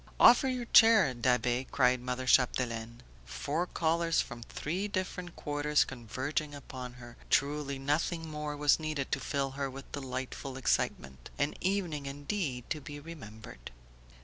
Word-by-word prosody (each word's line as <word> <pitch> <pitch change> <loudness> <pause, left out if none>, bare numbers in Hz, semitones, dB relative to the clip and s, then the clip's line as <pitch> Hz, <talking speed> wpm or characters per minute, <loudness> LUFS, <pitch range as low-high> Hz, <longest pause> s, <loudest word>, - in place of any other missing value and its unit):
"Offer 245 +2 +8
your 250 -2 -2
chair, 225 - +7
Da'Be!" 125 +1 +1
cried 125 -2 +3
mother 125 +1 -3
Chapdelaine. 115 - +1 0.2
Four 150 - -2
callers 165 0 +1
from 120 -1 -3
three 175 - -3
different 185 -3 -4
quarters 150 0 +1
converging 130 +5 -3
upon 130 -3 -8
her, 120 -1 -12
truly 140 -1 +1
nothing 160 +4 -1
more 150 -1 -4
was 145 +1 +4
needed 155 -3 -3
to - - +1
fill 140 -1 -1
her 135 0 -3
with 135 +1 -10
delightful 130 0 -5
excitement. 65 - -1
An 145 +1 0
evening 175 -7 -1
indeed 140 - -3
to 155 - -2
be 145 +1 -8
remembered! 110 - -10
140 Hz, 140 wpm, -31 LUFS, 125-160 Hz, 0.2 s, Offer